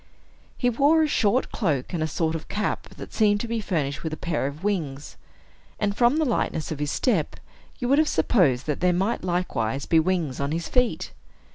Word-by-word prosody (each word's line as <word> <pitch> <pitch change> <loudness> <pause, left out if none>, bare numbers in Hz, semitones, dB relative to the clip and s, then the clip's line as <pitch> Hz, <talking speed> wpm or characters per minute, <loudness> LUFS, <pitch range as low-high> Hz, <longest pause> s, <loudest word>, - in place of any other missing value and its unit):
He 245 - +1
wore 295 +6 +4
a - - +2
short 235 -3 +1
cloak 150 - -1
and 170 - -1
a 155 - +1
sort 160 +1 -1
of 160 -1 -5
cap 210 - -2
that - - -9
seemed 205 -2 +3
to 235 - -4
be 230 -1 -2
furnished 150 -8 -2
with 160 - -4
a 155 - -4
pair 160 -5 -1
of 145 +5 -8
wings; 155 -9 -2 0.6
and 200 -1 0
from 240 +5 +3
the 315 - +2
lightness 165 - -1
of 155 - -4
his 150 0 -1
step, 195 - 0 0.4
you 245 - -3
would 280 +4 +4
have 310 - +3
supposed 160 - +2
that 150 -2 -2
there 180 0 +3
might 195 +5 0
likewise 140 -9 -1
be 165 - +4
wings 160 -5 0
on 140 +2 -1
his 165 +1 -2
feet. 250 -2 0
175 Hz, 210 wpm, -25 LUFS, 150-225 Hz, 0.6 s, wore